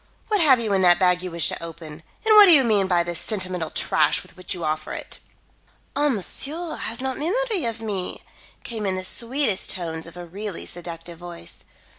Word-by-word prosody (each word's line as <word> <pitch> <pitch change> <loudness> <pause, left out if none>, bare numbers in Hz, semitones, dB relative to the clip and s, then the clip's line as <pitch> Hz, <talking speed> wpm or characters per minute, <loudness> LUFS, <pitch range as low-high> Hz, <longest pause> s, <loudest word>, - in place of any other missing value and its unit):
What 420 -3 +2
have 270 -6 +6
you 220 -3 -1
in 190 - +3
that 175 -1 +6
bag 180 -1 +3
you 185 - -4
wish 170 -1 -1
to - - -5
open; 160 -2 -9 0.2
and 435 -1 +6
what 420 -1 +11
do 370 - +7
you 280 -4 +6
mean 210 -5 +2
by 175 -2 +2
the 175 0 -4
sentimental 185 -3 -2
trash 155 -1 +1
with - - -20
which 185 -1 -7
you 175 - -6
offer 155 0 -2
it?" - - -8 0.8
"Ah, 290 +1 +2
monsieur 285 - -1
has 230 +1 -5
not 265 0 -3
memory 405 - -1
of 230 -1 -3
me," 200 -5 -4 0.4
came 220 -3 -4
in 190 - 0
the 185 - -4
sweetest 235 +1 +2
tones 165 -3 -3
of 170 - -12
a 175 - -7
really 195 +2 -6
seductive 170 -1 -8
voice. 175 - -9
190 Hz, 205 wpm, -23 LUFS, 170-255 Hz, 0.8 s, what